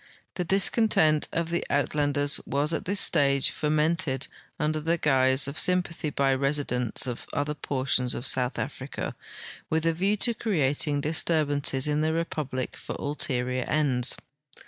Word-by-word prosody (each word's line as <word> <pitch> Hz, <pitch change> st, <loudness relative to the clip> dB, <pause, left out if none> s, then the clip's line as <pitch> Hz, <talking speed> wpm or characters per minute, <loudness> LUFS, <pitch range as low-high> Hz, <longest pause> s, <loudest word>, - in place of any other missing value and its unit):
The 180 Hz, -, -2 dB
discontent 190 Hz, -4 st, +3 dB
of 170 Hz, 0 st, -2 dB
the 170 Hz, -, 0 dB
Uitlanders 145 Hz, 0 st, +1 dB
was 145 Hz, +4 st, +1 dB
at -, -, -3 dB
this 200 Hz, +2 st, 0 dB
stage 140 Hz, -1 st, +3 dB
fomented 150 Hz, -3 st, 0 dB, 0.3 s
under 155 Hz, 0 st, 0 dB
the 165 Hz, +3 st, 0 dB
guise 130 Hz, -3 st, +3 dB
of 140 Hz, +2 st, -4 dB
sym 180 Hz, 0 st, +3 dB
pathy 165 Hz, -3 st, -5 dB
by 140 Hz, -1 st, +1 dB
residents 135 Hz, -4 st, -1 dB
of 125 Hz, -2 st, -5 dB
other 145 Hz, +1 st, -1 dB
portions 130 Hz, -3 st, -1 dB
of 120 Hz, -, -4 dB
South 125 Hz, -1 st, +2 dB
Africa 135 Hz, -1 st, -5 dB, 0.6 s
with 160 Hz, 0 st, 0 dB
a 165 Hz, -, +2 dB
view 195 Hz, +5 st, +1 dB
to 235 Hz, +3 st, +2 dB
creating 145 Hz, -, 0 dB
disturbances 150 Hz, -3 st, 0 dB
in 150 Hz, 0 st, +1 dB
the 160 Hz, +1 st, +1 dB
republic 150 Hz, -6 st, -3 dB
for -, -, -7 dB
ulterior 130 Hz, -3 st, -1 dB
ends. 135 Hz, -5 st, +1 dB
145 Hz, 145 wpm, -26 LUFS, 135-160 Hz, 0.6 s, discontent